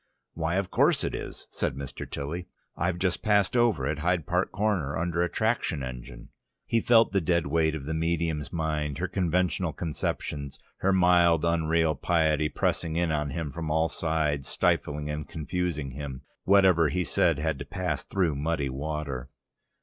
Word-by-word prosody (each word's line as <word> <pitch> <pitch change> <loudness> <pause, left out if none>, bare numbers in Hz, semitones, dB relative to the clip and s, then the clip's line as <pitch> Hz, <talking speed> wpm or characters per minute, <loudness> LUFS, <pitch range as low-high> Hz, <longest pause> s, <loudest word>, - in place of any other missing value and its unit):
"Why, 80 +1 -1
of 95 -1 -1
course - - +3
it - - -2
is," - - -6
said - - -2
Mr. 70 -1 -7
Tilly. 80 +6 -4 0.3
"I've 90 +1 -1
just 90 -1 0
passed 105 0 +2
over 120 - +3
at 75 +2 -1
Hyde 85 -1 +1
Park 90 +1 0
Corner 95 -8 0
under 85 0 0
a 90 - +1
traction 110 - 0
engine..." 65 -1 -8 0.4
He 115 - +1
felt 115 0 +5
the 100 - +2
dead 85 +1 +1
weight 80 +1 +1
of 70 -3 -6
the 80 - -2
medium's 80 -2 -1
mind, 75 -3 -2
her 90 +3 -1
conventional 90 -2 0
conceptions, 75 -3 -3 0.2
her 95 - +1
mild, 90 -3 +4
unreal 80 -1 +2
piety 80 0 +1
pressing 80 +1 -1
in 85 -1 +1
on 75 -2 0
him 80 -3 -4
from 80 0 -5
all 80 +1 +2
sides, 75 -4 -1
stifling 75 0 0
and 75 0 -4
confusing 80 -3 -3
him. 70 -1 -7 0.2
Whatever 95 -5 +5
he 90 +6 0
said 85 -3 +2
had 75 -2 -1
to 70 - -5
pass 85 -2 -3
through 90 -6 0
muddy 75 -1 -1
water... 70 -2 -4
80 Hz, 170 wpm, -27 LUFS, 75-90 Hz, 0.4 s, felt